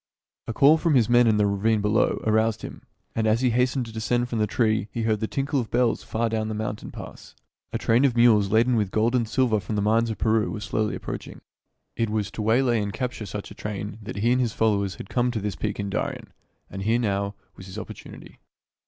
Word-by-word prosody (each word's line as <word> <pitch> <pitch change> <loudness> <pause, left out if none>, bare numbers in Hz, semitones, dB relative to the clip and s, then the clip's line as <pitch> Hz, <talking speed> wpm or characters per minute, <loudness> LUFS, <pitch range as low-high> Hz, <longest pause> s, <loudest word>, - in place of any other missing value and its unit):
A 115 - -3
call 145 +7 +5
from 160 -3 +2
his 120 -4 +4
men 120 0 +5
in 110 -1 +3
the 105 - +3
ravine 105 +2 +1
below 105 +1 +1
aroused 110 0 +1
him; - - -8 0.3
and 110 -1 0
as 110 +2 +2
he 125 -2 +2
hastened 125 +2 +1
to 115 - -9
descend 120 +2 -1
from 115 - -2
the 105 - +2
tree 110 -1 +1
he 115 - -3
heard 110 -1 +1
the 110 - -1
tinkle 140 +3 -1
of 115 - -3
bells 120 -1 +1
far 115 +1 -1
down 110 -1 -1
the 110 - -3
mountain 105 0 -4
pass. - - -11 0.4
A - - -1
train 115 +4 +2
of 125 -4 +2
mules 110 -4 +5
laden 115 +4 +3
with 105 -4 +1
gold 110 +4 +1
and 120 -3 +1
silver 120 -3 +2
from 105 +2 -5
the 105 - 0
mines 115 +2 +2
of 110 - -4
Peru 110 0 +1
was 105 -1 -5
slowly 110 +1 -1
approaching. - - -7 0.5
It 115 -1 0
was 105 -1 -2
to - - -5
waylay 120 +1 +2
and 100 -1 -3
capture 125 -3 -4
such 105 0 -6
a - - -7
train 105 0 -6
that 110 +4 -7
he 110 +4 +1
and 125 +1 +3
his 120 -3 -1
followers 100 -3 +1
had - - -9
come 125 +3 +1
to 120 -2 -2
this 100 -1 -3
peak 105 -1 -3
in 100 -1 -3
Darien; - - -4 0.3
and 95 - -7
here, 110 +4 +2
now, 100 -3 -1 0.2
was 95 - -11
his 95 +2 -9
opportunity. - - -10
110 Hz, 240 wpm, -25 LUFS, 105-120 Hz, 0.5 s, call